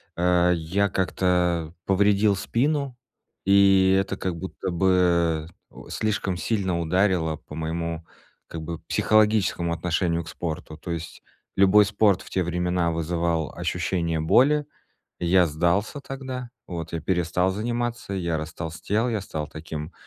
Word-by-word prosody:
э. 90 0 +3
Я 95 +5 0
как-то 90 -2 0
повредил 100 +1 +3
спину, 140 +5 -1 0.5
и 95 -1 +5
это 95 - -2
как 90 -2 -3
будто 95 +1 -5
бы, 85 -3 +2 0.2
о, - - -13
слишком 100 -4 -1
сильно 95 -5 -1
ударило 85 -2 +1
по 75 - -12
моему 80 +1 -3 0.4
как 80 - -7
бы 85 +1 -5
психологическому 105 -6 +2
отношению 85 0 0
к 80 - -10
спорту. 80 -1 -5
То 85 - -7
есть 85 0 -6 0.3
любой 100 +2 +6
спорт 100 -2 +2
в - - -12
те 95 - 0
времена 90 0 0
вызывал 85 -1 -1
ощущение 85 -2 -1
боли. 140 - +4 0.5
Я 90 +1 +4
сдался 85 - 0
тогда, 130 -2 -6 0.2
вот, 85 -3 -6
я 85 - -2
перестал 90 0 +1
заниматься, 120 +1 -3
я 85 -4 -1
растолстел, 80 +8 -2
я 110 -3 -1
стал 75 -5 -5
таким, 75 +1 -7
90 Hz, 130 wpm, -25 LUFS, 85-100 Hz, 0.5 s, любой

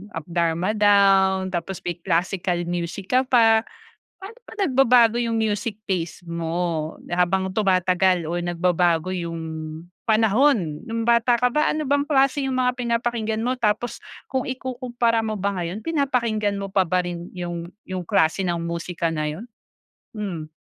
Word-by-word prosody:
Up 160 - -4
Darma 170 +2 0
Down, 195 -2 +4
tapos 180 +1 -4
may 175 0 -4
classical 175 0 0
music 175 +2 -4
ka 260 - +5
pa. 225 -3 +5 0.6
Paano 410 +5 -11
ba - - -10
nagbabago 250 - +4
yung 230 -1 0
music 215 0 -1
taste 175 -2 -3
mo 170 -1 -2 0.2
habang 185 +2 +1
tumatagal 185 -3 +2
o 170 - -2
nagbabago 175 0 +1
yung 170 -2 -4 0.6
panahon? 220 - +2
No'ng 230 0 -2
bata 235 +1 +4
ka 250 - +3
ba 300 - +2
ano 310 - -2
bang 285 +1 +2
klase 275 -1 +2
yung 260 -1 -1
mga 250 0 +1
pinapakinggan 235 -2 -1
mo 255 +1 0
tapos 220 +2 0 0.3
kung 260 -1 -1
ikukumpara 245 -3 -1
mo 215 -1 -2
ba 200 +1 -1
ngayon 175 +4 -4
pinapakinggan 235 -10 0
mo 195 - -4
pa 195 -1 +3
ba 185 +2 +2
rin 175 0 -6
yung 175 -1 -5 0.2
yung 185 -1 -4
klase 160 +4 +2
ng 175 -2 -1
musika 170 0 -3
na 155 - -2
yun? 170 +10 -7 0.7
Hmm. 175 -7 -4
195 Hz, 150 wpm, -23 LUFS, 175-235 Hz, 0.7 s, ka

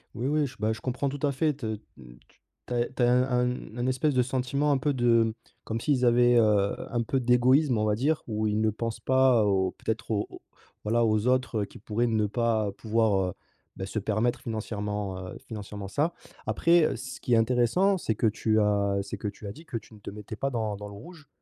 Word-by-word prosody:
Oui, 120 +4 -2
oui 150 0 +1
j - - -12
bah 110 +1 +1
je 110 - -8
comprends 130 +2 -1
tout 140 +1 -6
à 145 - +2
fait 150 +3 +1
te 135 -4 -8
n 110 -1 -3 0.5
tu - - -29 0.3
tu - - -4
as 120 - +2
e 120 - -1
tu 125 - +1
as 120 - +4
un 125 +1 +4 0.2
un 125 -2 -4
un 120 +1 -1
espèce 130 +3 +1
de 130 - +3
sentiment 130 +3 0
un 140 - +3
peu 140 +2 0
de 115 -3 +3 0.3
comme 115 +1 -3
s'ils 130 -3 +2
avaient, 120 0 +5
heu, 105 -3 +3 0.2
un 120 -1 +1
peu 135 +4 0
d'égoïsme, 125 +2 +3
on 110 - +1
va 105 -1 +2
dire 145 +7 0
où 110 -1 -1
ils 105 0 0
ne 110 0 +2
pensent 115 +1 -4
pas 130 -3 +4
au 95 -2 +2
peut-être 110 +1 -4
au 105 -1 0
au - - -12 0.4
voilà 115 +3 +2
aux 110 +1 +1
autres, 125 -3 +1
heu, - - -2
qui - - -14
pourraient 110 +4 -1
ne 110 -2 +1
pas 110 -2 0
pouvoir, 110 -2 +1 0.2
heu, - - -12 0.4
beh 95 - -5
se 105 +2 -3
permettre 110 +4 0
financièrement, 105 -4 -4
heu, - - -8
financièrement 105 -2 -7
ça. 150 +9 0 0.3
Après, 170 -1 +4
heu, - - 0
ce 130 +3 -7
qui 125 - -1
est - - +6
intéressant, 125 - +3
c'est 110 -10 -2
que 110 - +2
tu 110 0 +1
as 100 -1 +1
c'est 100 - -6
que - - -4
tu 105 +1 -8
as - - -4
dit 160 +10 -13
que 135 - -8
tu 115 - -12
ne 105 - -14
te - - -8
mettais 105 +1 -8
pas 135 - -1
dans 110 -5 -2
dans 105 0 -7
le 100 - -10
rouge, 155 - -12
115 Hz, 245 wpm, -27 LUFS, 105-130 Hz, 0.5 s, est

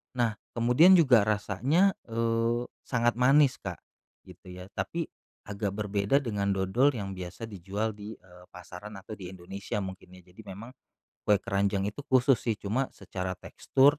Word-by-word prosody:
Nah, 115 -4 0 0.2
kemudian 125 +11 +6
juga 125 - +5
rasanya, 110 - +2 0.2
eee, 115 +1 0 0.2
sangat 120 -1 +1
manis, 135 +2 +5
Kak, - - -6 0.4
gitu - - -16
ya, 90 +2 -10
tapi 155 - -3 0.3
agak 100 -1 -3
berbeda 105 +6 +1
dengan 100 -4 -1
dodol 120 +9 +2
yang 100 -3 -4
biasa 90 +2 -7
dijual 105 +1 -3
di, 105 +1 -9
eee, 90 -1 -18
pasaran 90 +4 -10
atau 95 +2 -9
di 90 - -7
Indonesia 95 +2 -5
mungkin 95 -1 -9
ya. 90 - -14
Jadi 95 - -13
memang 105 +6 -8 0.6
kue 105 - +6
keranjang 100 0 0
itu 110 - -9
khusus 130 0 +4
sih, 115 - -1
cuma 120 +7 -1
secara 95 -1 -5
tekstur 140 - +2
105 Hz, 155 wpm, -29 LUFS, 95-125 Hz, 0.6 s, kemudian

